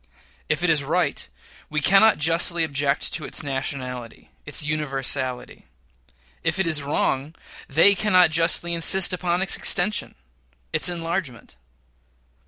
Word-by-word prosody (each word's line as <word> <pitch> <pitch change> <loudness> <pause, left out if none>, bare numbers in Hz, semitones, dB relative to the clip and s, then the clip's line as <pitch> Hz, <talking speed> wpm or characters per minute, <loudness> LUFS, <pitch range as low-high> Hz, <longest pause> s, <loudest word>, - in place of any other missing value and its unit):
If 155 +2 -1
it 180 - +3
is 150 -3 +1
right, 170 +6 -1 0.4
we 150 - -1
cannot 195 +8 +4
justly 165 +2 +2
object 145 -1 -1
to 160 - -3
its 135 - -6
nationality 130 -3 -6 0.2
its 145 - -3
universality; 135 -4 -3 0.8
if 160 - -1
it 190 - 0
is 155 -3 +1
wrong, 140 +1 -2 0.3
they 165 +8 +5
cannot 185 -4 +3
justly 170 +1 0
insist 180 +3 +3
upon 180 0 -1
its 190 - +1
extension 200 +3 +1 0.6
its - - +2
enlargement. 165 - -5
160 Hz, 125 wpm, -23 LUFS, 140-175 Hz, 0.8 s, they